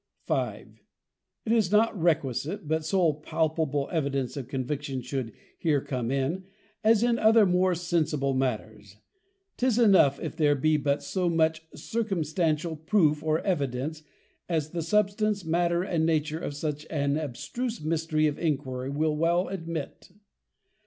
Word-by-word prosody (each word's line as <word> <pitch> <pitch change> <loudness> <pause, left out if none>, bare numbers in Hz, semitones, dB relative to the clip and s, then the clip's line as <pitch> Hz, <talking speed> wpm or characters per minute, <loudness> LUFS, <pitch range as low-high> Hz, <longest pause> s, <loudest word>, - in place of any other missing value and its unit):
5. - - -3 0.6
It 220 - -1
is 220 -5 +2
not 220 +2 +3
requisite, 160 - -1
that 160 0 +1
so 170 -1 +2
palpable 155 -2 -1
Evidence 140 -6 -1
of 135 -4 -5
Conviction 135 0 -3
should 130 -2 -3 0.3
here 155 -4 +2
come 125 -3 -3
in, 140 +8 -1 0.4
as 220 0 +4
in 240 -1 +2
other 220 0 +6
more 180 0 +2
sensible 160 -5 0
matters; 110 -6 -3 0.6
'tis 250 -2 +1
enough, 190 - +5
if - - -5
there 150 -3 +3
be 155 +3 +2
but 140 -1 0
so 185 -2 -1
much 160 -1 +1
circumstantial 165 -6 -1
Proof 155 -2 +2
or 155 0 +1
Evidence, 145 -3 -2 0.5
as 155 -3 -1
the 170 - -2
Substance, 205 +2 +1
Matter, 170 +1 +1
and 170 -4 0
Nature 155 -1 0
of 145 - -5
such 150 0 -4
an 140 -2 0
abstruse 160 - -4
Mystery 155 0 0
of 150 -1 -1
Iniquity 135 -5 -2
will 150 +2 0
well 170 +3 +1
admit. 165 -5 -6
160 Hz, 140 wpm, -27 LUFS, 145-180 Hz, 0.6 s, other